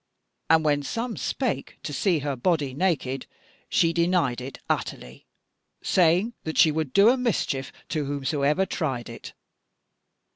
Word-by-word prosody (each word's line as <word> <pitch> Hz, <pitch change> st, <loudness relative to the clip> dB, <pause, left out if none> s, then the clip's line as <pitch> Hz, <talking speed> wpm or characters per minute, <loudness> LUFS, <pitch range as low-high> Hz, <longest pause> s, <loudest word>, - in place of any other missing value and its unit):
And 160 Hz, -1 st, +4 dB
when 145 Hz, -1 st, +2 dB
some 230 Hz, -, -3 dB
spake -, -, -3 dB
to -, -, -5 dB
see 185 Hz, -6 st, +2 dB
her 140 Hz, -2 st, -1 dB
body 145 Hz, 0 st, 0 dB
naked, 140 Hz, -5 st, -1 dB, 0.4 s
she 165 Hz, 0 st, +3 dB
denied 170 Hz, -7 st, +1 dB
it 130 Hz, +2 st, -7 dB
utterly, 60 Hz, +1 st, -4 dB, 0.6 s
saying 180 Hz, +6 st, +3 dB
that 160 Hz, -, -4 dB
she 155 Hz, -, +6 dB
would 155 Hz, -3 st, -2 dB
do 200 Hz, -, +6 dB
a 255 Hz, -, +3 dB
mischief 180 Hz, -, -1 dB, 0.2 s
to 155 Hz, -3 st, -1 dB
whomsoever 145 Hz, +5 st, 0 dB
tried 130 Hz, -11 st, -3 dB
it. 115 Hz, -, -9 dB
155 Hz, 140 wpm, -25 LUFS, 135-180 Hz, 0.6 s, she